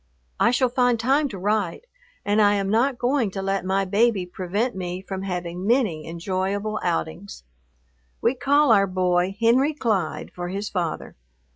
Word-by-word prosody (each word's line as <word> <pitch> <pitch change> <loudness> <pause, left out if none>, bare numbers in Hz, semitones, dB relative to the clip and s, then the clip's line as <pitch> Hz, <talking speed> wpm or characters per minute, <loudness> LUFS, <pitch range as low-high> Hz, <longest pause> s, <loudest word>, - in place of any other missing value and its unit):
I - - +4
shall 250 +1 +2
find 245 -1 +2
time 275 +5 +2
to 200 - -7
write, 205 - -1 0.4
and 205 +1 +2
I 205 0 +4
am 195 -1 -1
not 245 +4 +2
going 245 -2 +1
to 195 +1 -5
let 195 -1 -1
my 195 +1 0
baby 205 0 +2
prevent 190 +7 -2
me 180 -1 -4
from 190 0 -6
having 180 -1 -4
many 215 - +1
enjoyable 190 +5 -2
outings. 175 +3 -3 0.8
We 235 - +2
call 280 +1 +3
our 200 -2 +5
boy 185 +1 0
Henry 255 +6 +3
Clyde 210 - -1
for 175 0 -5
his 200 +3 -4
father. 175 -4 -4
200 Hz, 160 wpm, -23 LUFS, 185-235 Hz, 0.8 s, our